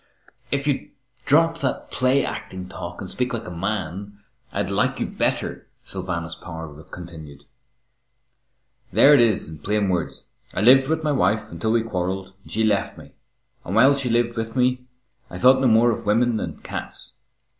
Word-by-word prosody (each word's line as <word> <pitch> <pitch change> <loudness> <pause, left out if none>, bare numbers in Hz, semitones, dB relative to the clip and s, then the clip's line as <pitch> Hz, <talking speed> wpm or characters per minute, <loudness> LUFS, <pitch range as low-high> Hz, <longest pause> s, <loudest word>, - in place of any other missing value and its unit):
"If 140 0 -1
you'd 145 -2 -1 0.4
drop 165 +3 +3
that 135 -4 -2
play 130 +2 +2
acting 95 -1 -6
talk 90 -1 -7
and 95 - -5
speak 125 +5 -2
like 115 - -5
a - - -6
man, 100 +2 -4 0.3
I'd - - -2
like - - +1
you - - 0
better," - - -2 0.2
Sylvanus 85 -3 -4
Power 80 -4 -9
continued. 80 -5 -10 1.5
"There 145 - +7
it 145 - +7
is 115 -4 +2
in 80 -1 -10
plain 105 +4 0
words. 90 -2 -3 0.3
I - - 0
lived 135 +4 +6
with 160 0 0
my 150 - +1
wife 110 -6 +1
until 95 +7 -1
we 115 -1 +2
quarrelled 95 -2 -3
and - - -16
she 110 - 0
left 105 -2 +1
me, - - -13 0.5
and 95 - -4
while 135 +5 +6
she 135 -3 -2
lived 120 0 +1
with 115 0 -4
me 125 0 +1 0.4
I - - -7
thought 130 +1 +5
no 130 - +4
more 115 +1 +5
of 115 -1 -5
women 115 +2 +3
than - - -4
cats. - - -7
110 Hz, 175 wpm, -23 LUFS, 90-125 Hz, 1.5 s, There